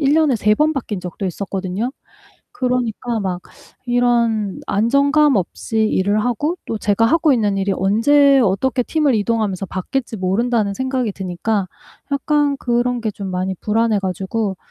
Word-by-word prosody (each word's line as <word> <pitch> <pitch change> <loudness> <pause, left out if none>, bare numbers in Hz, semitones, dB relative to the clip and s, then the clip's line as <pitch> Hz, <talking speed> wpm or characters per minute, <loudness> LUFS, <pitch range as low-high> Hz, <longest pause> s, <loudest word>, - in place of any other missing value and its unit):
1 285 0 +3
년에 310 -4 +3
3 210 -1 +2
번 305 +5 +2
바뀐 235 -8 -4
적도 180 +2 -5
있었거든요. 195 +5 -3 0.6
그러니까 245 - -1
막 185 -3 -3 0.5
이런 235 -4 +1
안정감 280 +6 +3
없이 205 +4 -3
일을 200 +3 +1
하고 290 - -1
또 225 - -3
제가 210 +1 +1
하고 320 +3 +3
있는 210 -5 +1
일이 195 0 0
언제 270 +8 +4
어떻게 240 +4 +1
팀을 295 0 +1
이동하면서 210 -3 -1
바뀔지 225 +6 -3
모른다는 205 +2 0
생각이 260 -2 -1
드니까 190 +2 -2 0.4
약간 290 0 +1
그런 240 0 0
게 220 -2 -1
좀 200 -1 -7
많이 185 +1 -2
불안해 220 -1 +1
가지고 190 +2 -2
225 Hz, 310 characters per minute, -19 LUFS, 195-260 Hz, 0.6 s, 언제